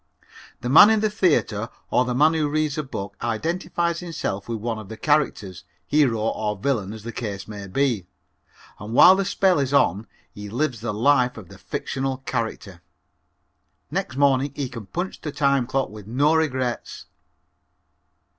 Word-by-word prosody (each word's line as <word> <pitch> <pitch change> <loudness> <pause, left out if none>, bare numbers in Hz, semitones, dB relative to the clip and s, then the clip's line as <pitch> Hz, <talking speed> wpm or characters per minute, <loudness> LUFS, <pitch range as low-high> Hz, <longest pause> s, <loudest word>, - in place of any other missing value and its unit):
The - - -4
man 160 +10 +9
in 220 -1 +3
the 215 -1 +1
theater 145 - +1 0.2
or 125 - +3
the 125 -1 -2
man 155 +5 +4
who 155 -2 0
reads 155 -1 0
a 155 - -1
book 100 -8 -7
identifies 170 +7 -1
himself 155 - -4
with 115 - -2
one 110 0 -3
of 105 -3 -10
the 110 - -8
characters, 110 - 0 0.2
hero 130 -2 +2
or 105 -1 -1
villain 110 -4 -1
as 110 -1 -9
the 115 - -5
case 100 -5 -5
may 100 -2 -8
be, 115 -3 0 0.7
and 105 +3 -6
while 185 - +9
the 195 - 0
spell 185 -3 +2
is 140 0 0
on 105 -4 +2 0.3
he 105 0 -8
lives 125 0 -2
the 120 - -2
life 125 +3 +2
of 95 -6 -11
the - - -14
fictional 135 -1 -3
character. 110 -7 -4 1.1
Next 130 - -3
morning 140 0 +2
he 140 -3 -3
can 115 -5 -9
punch 175 - -4
the 150 - -4
time 140 -3 +1
clock 135 +1 -1
with 105 -1 -11
no 140 +7 +2
regrets. 130 -6 -2
130 Hz, 170 wpm, -23 LUFS, 110-150 Hz, 1.1 s, man